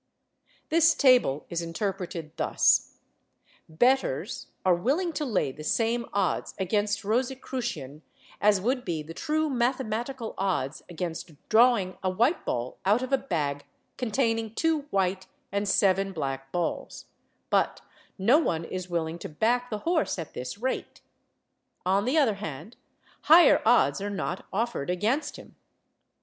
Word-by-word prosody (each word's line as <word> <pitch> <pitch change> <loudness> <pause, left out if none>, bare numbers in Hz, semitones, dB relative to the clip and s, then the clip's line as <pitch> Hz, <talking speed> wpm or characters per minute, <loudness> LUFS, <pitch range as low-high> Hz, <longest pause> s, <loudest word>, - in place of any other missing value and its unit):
This 330 0 +5
table 250 - +4
is 170 0 -1
interpreted 170 -2 -4
thus: - - +2 0.7
bettors 245 - +1 0.2
are 185 - +5
willing 290 - 0
to 305 - -2
lay 190 - 0
the 155 +3 -10
same 230 +7 0
odds 195 -3 -1
against 205 +2 0
Rosicrucian 240 - -3 0.4
as 205 -1 +4
would 250 +6 0
be 160 -7 -3
the 160 +2 -9
true 310 - 0
mathematical 245 -2 -2
odds 180 -8 -1
against 170 -1 -5 0.2
drawing 220 -5 +4
a 190 - 0
white 235 - +1
ball 120 +1 -3
out 210 +6 +3
of 260 +1 -4
a - - +6
bag 145 - -2 0.3
containing 225 -2 -1
two 315 -3 0
white 190 -2 0 0.2
and 200 +1 -1
seven 195 0 +2
black 135 -4 -4
balls; 175 -1 -3 0.5
but - - +1 0.4
no 230 +10 +5
one 165 - -1
is 185 +1 -5
willing 170 -1 -2
to - - -7
back 240 +10 0
the 215 - -2
horse 335 - +1
at 165 -3 -6
this 125 +8 -6
rate; 255 +4 -4 0.8
on 195 +3 +2
the 265 +6 +1
other 235 -10 +3
hand, 210 - -7 0.5
higher 330 +1 +7
odds 170 - +4
are 205 - -2
not 195 -2 -4
offered 220 -8 -2
against 215 - 0
him. - - -13
205 Hz, 140 wpm, -27 LUFS, 170-250 Hz, 0.8 s, higher